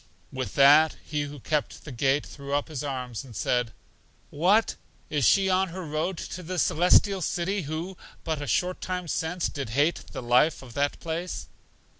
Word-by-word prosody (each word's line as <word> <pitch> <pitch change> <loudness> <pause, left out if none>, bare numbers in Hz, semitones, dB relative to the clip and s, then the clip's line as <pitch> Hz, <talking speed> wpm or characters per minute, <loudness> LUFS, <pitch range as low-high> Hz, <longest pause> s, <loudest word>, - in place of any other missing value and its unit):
With 130 -1 -4
that, 145 +3 +6
He 150 -1 -2
who 145 0 -9
kept 150 +3 -2
the 150 - -7
gate 135 +3 +1
threw 140 -1 -5
up 145 - -1
His 150 -4 -4
arms 125 -5 -4
and 125 -5 -13
said, 125 +1 0 0.6
What! 190 +9 +3 0.4
is 145 -4 +1
she 195 -1 +5
on 190 0 +2
her 180 +1 -7
road 160 +4 -2
to 180 - -6
The 180 +1 -5
Celestial 180 +4 +4
City 185 +4 -1
who, 165 +4 -5 0.3
but 160 -2 -2
a 145 - -4
short 180 0 0
time 180 -1 -3
since, 165 +2 -1
did 140 -5 -5
hate 145 +8 +1
the - - -6
life 125 +6 +3
of 120 -3 -12
that 145 +2 0
place? 170 +2 -4
155 Hz, 180 wpm, -27 LUFS, 140-180 Hz, 0.6 s, that